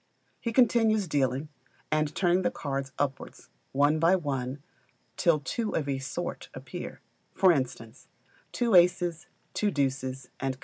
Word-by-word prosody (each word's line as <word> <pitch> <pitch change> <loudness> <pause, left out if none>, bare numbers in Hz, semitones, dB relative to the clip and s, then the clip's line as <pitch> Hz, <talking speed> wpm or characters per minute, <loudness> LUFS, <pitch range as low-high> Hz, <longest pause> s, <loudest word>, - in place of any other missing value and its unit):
He 235 - -2
continues 225 -4 +3
dealing, 140 0 0 0.4
and 155 -1 +1
turning 180 0 +3
the - - +1
cards 135 -2 -4
upwards, 140 -2 -4 0.2
one 145 +3 +3
by 165 +4 +5
one, 140 -4 -3 0.5
till 165 -3 +3
two 215 - -2
of 150 - -1
a 135 -1 -1
sort 135 0 -5
appear: - - -7 0.3
for 190 -2 +6
instance, 130 0 -3 0.4
two 235 -3 0
aces, 175 -2 +4 0.3
two 210 - +1
deuces, 135 -4 -2
&c. 135 0 0
150 Hz, 135 wpm, -28 LUFS, 135-180 Hz, 0.5 s, for